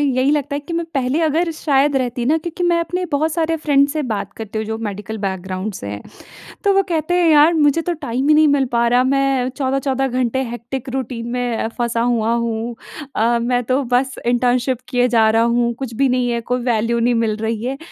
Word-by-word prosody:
यही 270 -1 +2
लगता 290 -1 0
है - - -3
कि 295 +4 -9
मैं 335 0 -1
पहले 270 +3 0
अगर 325 +2 +1
शायद 285 -2 +1
रहती 245 -2 -1
ना 310 +4 +3
क्योंकि 340 +2 -6
मैं 345 -1 +3
अपने 360 +2 -2
बहुत 305 +2 +1
सारे 325 0 0
फ्रेंड्स 285 -2 +2
से 310 - -2
बात 205 -6 -3
करती 220 -1 -5
हूँ 220 - -2
जो 220 0 -3
मेडिकल 210 0 -5
बैकग्राउंड 190 +1 -4
से 100 - -7
हैं। 100 0 -6 0.6
तो 400 -2 +3
वो 390 - +3
कहते 325 0 -1
हैं 335 - +4
यार 300 +3 +6
मुझे 305 0 +3
तो 350 +1 -2
टाइम 270 -3 -3
ही - - +7
नहीं 310 0 +5
मिल 285 -2 +3
पा 235 0 +2
रहा, 245 +1 +3
मैं 270 -1 +1
14-14 270 0 -1
घंटे 255 0 -1
हेक्टिक 240 +2 -6
रूटीन 245 -3 -4
में 245 -3 -1
फँसा 235 -1 0
हुआ 230 -1 +1
हूँ। 235 0 -2 0.4
अ, 235 +2 +2
मैं 245 +1 0
तो 255 +4 0
बस 260 +1 +1
इंटर्नशिप 245 +1 +1
किए 245 0 +2
जा 225 -2 +3
रहा 225 +1 +3
हूँ, 235 0 +1
कुछ 250 -1 -6
भी 270 +3 +2
नहीं 250 -1 +1
है, 235 -1 -1
कोई 245 +2 -2
वैल्यू 235 -1 +1
नहीं 240 +1 +2
मिल 220 -2 0
रही 220 0 -3
है। 260 +2 -3
250 Hz, 220 wpm, -19 LUFS, 235-285 Hz, 0.6 s, ही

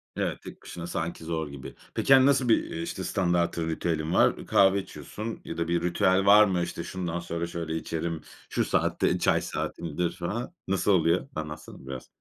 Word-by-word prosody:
Evet, - - -2
tek - - -11
başına 85 0 -7
sanki 85 -1 -4
zor 80 -1 -2
gibi. 70 -2 -9 0.2
Peki, 135 - +4
hani, 130 -1 +7
nasıl 135 -3 +3
bir, 115 - +4
iii, 165 -1 -4
işte, 170 +1 -4
standartın 85 -3 0
ritüelin 80 0 -1
var? - - +3
Kahve 100 0 +5
içiyorsun 110 +3 -7
ya 80 - -6
da 85 0 -1
bir 85 0 +1
ritüel 95 +2 +2
var 105 +2 +8
mı? 95 -3 0
İşte, 85 0 -4
şundan 85 -1 -3
sonra 85 0 -3
şöyle 85 -2 -4
içerim, 80 0 -3 0.3
şu - - 0
saatte - - +1
çay - - +3
saatimdir 85 +1 -3
falan. 115 - -4
Nasıl 95 +1 +2
oluyor? 85 +3 +3
Anlatsana 75 -3 -7
biraz. 65 -1 -6
85 Hz, 180 wpm, -27 LUFS, 80-95 Hz, 0.3 s, var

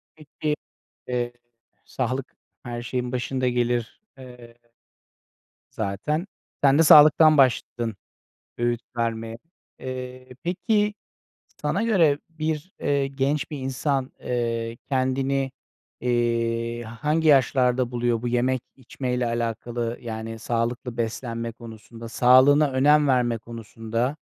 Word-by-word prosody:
Peki. 150 0 -3 0.5
Eee. 120 -1 -2 0.5
Sağlık 130 +1 -3 0.3
her 120 -1 -5
şeyin 125 +1 -3
başında 130 +1 -1
gelir, 120 - -1 0.2
eee 125 -2 -13 1.2
zaten. 130 - -2 0.4
Sen 140 +1 +6
de 165 - +7
sağlıktan 155 0 +8
başladın 120 -4 +2 0.6
öğüt 120 0 0 0.2
vermeye. 115 -1 -2 0.4
Eee, 130 0 -7 0.2
peki, 210 +4 +1 0.7
sana - - 0
göre 170 -11 +3
bir 160 +2 -3
eee, 140 -1 +1
genç 135 +1 -1
bir 150 - -5
insan, 135 0 -2
eee, 115 -1 -2
kendini, 135 0 0 0.5
eee, 115 -1 0
hangi 150 +8 0
yaşlarda 130 -2 +3
buluyor 120 -2 0
bu 120 - -1
yemek, 125 +1 +1 0.2
içmeyle 125 -1 -3
alakalı? 115 0 -2
Yani, 115 -1 -6
sağlıklı 120 +1 -2
beslenme 115 0 -3
konusunda, 115 0 -11
sağlığına 130 +5 +5
önem 145 +2 +4
verme 120 -3 +2
konusunda 115 +3 -4
125 Hz, 105 wpm, -24 LUFS, 115-135 Hz, 1.2 s, sağlıktan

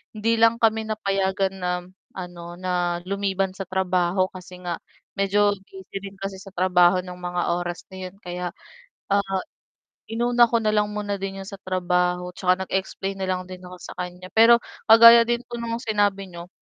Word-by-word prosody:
hindi 225 +2 +1
lang 230 0 +5
kami 220 -1 +2
napayagan 195 -2 0
na 180 0 -1 0.5
ano, 175 -1 -7
na 175 -1 -1
lumiban 195 -1 -1
sa 195 0 -6
trabaho, 185 0 +1
kasi 180 -1 -11
nga 175 -1 -3 0.4
medyo 205 +1 +3 0.2
busy 190 0 -13
rin 195 0 -9
kasi 195 -1 -5
sa 195 - -12
trabaho 180 0 +4
ng 180 -1 -8
mga 180 0 -3 0.2
oras 175 0 -5
na 185 -1 -6
'yon, 185 - -14
kaya, 180 0 -4 0.6
ah, 195 -2 +1 0.7
inuna 240 +1 +4
ko 235 - +2
na 215 - +2
lang 210 -1 +2
muna 205 -1 -2
din 195 0 -4
'yon - - -12
sa 200 - -8
trabaho, 180 -1 0
tsaka 185 0 +1
nag-explain 195 0 -3
na 190 - -2
lang 185 0 -1
din 185 0 -9
ako 180 0 -10
sa - - -8
kanya. 180 0 -6
Pero 235 +1 +7 0.3
kagaya 230 +1 +10
din 240 0 0
po 240 - -6
nung 230 0 -3
sinabi 205 -4 0
niyo, 170 0 -9
190 Hz, 175 wpm, -24 LUFS, 180-205 Hz, 0.7 s, kagaya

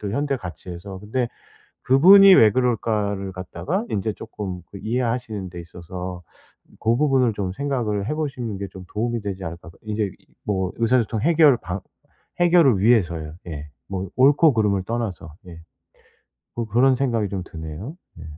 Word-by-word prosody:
그 100 -1 -4
현대 140 +1 0
가치에서. 90 0 -8
근데 120 +4 -2 0.6
'그분이 190 +9 +8
왜 110 -8 +7
그럴까.'를 105 -5 0
갖다가 145 - -3
인제 105 +2 -1
쪼끔 100 -5 -7
그 100 - -8
이해하시는 115 -4 -2
데 85 - -9
있어서 90 +1 -8 0.6
고 115 +2 +2
부분을 135 -5 +2
좀 100 -3 -3
생각을 110 -5 -2
해보시는 135 -8 -3
게 100 - -4
좀 95 -1 -11
도움이 115 +2 -1
되지 95 -2 -5
않을까 85 +1 -8
그 85 - -18
인제 105 -1 -1
이 95 - -16 0.2
뭐 95 -3 -1
의사소통 115 -2 +1
해결 155 -3 +5
방 90 -2 -5 0.6
해결을 170 - +5
위해서요. 85 -8 +2
예. 75 -2 -7 0.2
뭐 95 0 -4
옳고 145 +4 +5
그름을 105 -4 +1
떠나서. 100 -8 -4
예. 85 -2 -10 1.0
뭐 115 - -2
그런 125 +5 +3
생각이 120 -6 0
좀 95 -2 -3
드네요. 80 - -8 0.2
예. 80 - -9
105 Hz, 315 characters per minute, -22 LUFS, 95-125 Hz, 1.0 s, 그분이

